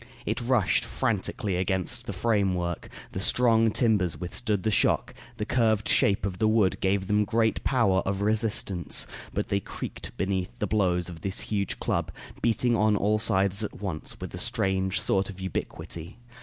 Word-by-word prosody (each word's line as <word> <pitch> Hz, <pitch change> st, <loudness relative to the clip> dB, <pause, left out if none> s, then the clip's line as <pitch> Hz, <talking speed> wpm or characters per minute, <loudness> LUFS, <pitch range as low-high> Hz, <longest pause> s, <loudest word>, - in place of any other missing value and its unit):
It 115 Hz, +4 st, -1 dB
rushed 120 Hz, -5 st, +2 dB
frantically 105 Hz, -4 st, -1 dB
against 95 Hz, 0 st, -1 dB
the -, -, -2 dB
framework; 95 Hz, -4 st, 0 dB, 0.2 s
the -, -, -4 dB
strong 115 Hz, +2 st, +3 dB
timbers 105 Hz, -6 st, +1 dB
withstood 100 Hz, +2 st, -1 dB
the 110 Hz, -, +1 dB
shock; 100 Hz, -, +2 dB, 0.2 s
the 105 Hz, -, -2 dB
curved 110 Hz, -3 st, +2 dB
shape 100 Hz, 0 st, +3 dB
of 90 Hz, -2 st, -4 dB
the 110 Hz, -, +3 dB
wood 110 Hz, -4 st, +2 dB
gave 95 Hz, 0 st, +1 dB
them 105 Hz, +1 st, +2 dB
great 110 Hz, +1 st, +1 dB
power 115 Hz, -8 st, +3 dB
of 95 Hz, +1 st, -2 dB
resistance; 105 Hz, -4 st, +1 dB, 0.3 s
but -, -, -3 dB
they 100 Hz, -, +1 dB
creaked -, -, -7 dB
beneath 95 Hz, -1 st, -1 dB
the -, -, -1 dB
blows 90 Hz, -4 st, +1 dB
of 85 Hz, -3 st, -8 dB
this 95 Hz, +1 st, -3 dB
huge 100 Hz, -3 st, -2 dB
club, -, -, -1 dB, 0.3 s
beating 120 Hz, +1 st, +2 dB
on 105 Hz, -1 st, +3 dB
all 105 Hz, +2 st, +2 dB
sides 100 Hz, -1 st, +2 dB
at 105 Hz, -, -5 dB
once, 90 Hz, -7 st, -4 dB
with -, -, -7 dB
a -, -, -5 dB
strange 95 Hz, -1 st, 0 dB
sort 95 Hz, 0 st, +1 dB
of 95 Hz, -1 st, -9 dB
ubiquity. 85 Hz, -1 st, -5 dB
100 Hz, 170 wpm, -27 LUFS, 95-110 Hz, 0.3 s, strong